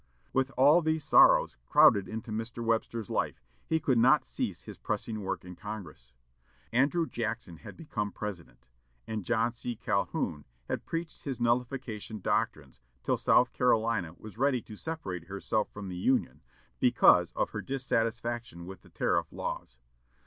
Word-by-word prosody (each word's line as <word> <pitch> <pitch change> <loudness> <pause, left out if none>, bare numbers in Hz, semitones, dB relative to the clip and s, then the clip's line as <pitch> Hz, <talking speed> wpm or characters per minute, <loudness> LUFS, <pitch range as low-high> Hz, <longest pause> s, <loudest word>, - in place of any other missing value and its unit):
With 135 0 +2
all 145 +6 +6
these 160 -1 0
sorrows - - +6
crowded 95 +7 +6
into 110 +2 -6
Mr. 115 +2 -4
Webster's 115 -1 -1
life, - - -1 0.3
he 160 - +2
could 130 -6 +2
not 125 +3 +5
cease - - -3
his - - -10
pressing 110 -2 -3
work 95 -1 -4
in 90 0 -9
Congress. 105 - -8 0.6
Andrew 140 +8 +2
Jackson 115 - -4
had - - -11
become 110 -11 -3
President, 85 - -8 0.4
and 110 -2 -4
John 115 +2 +1
C. 120 0 -5
Calhoun 75 -7 -2 0.2
had - - -4
preached 165 0 -4
his 135 -4 -3
Nullification 120 -2 -1
doctrines 90 - -1 0.2
till - - +2
South 125 0 +3
Carolina 115 -8 +1
was 110 +1 -11
ready 130 -3 +2
to 110 - -10
separate 100 - -5
herself 100 +3 -2
from 105 -1 -7
the 90 -1 -5
Union, 130 +8 +1 0.4
because 115 -8 +5
of - - -1
her - - -4
dissatisfaction 120 -7 -2
with 95 +1 -9
the - - -19
tariff - - 0
laws. 60 - -5
115 Hz, 150 wpm, -30 LUFS, 100-125 Hz, 0.6 s, all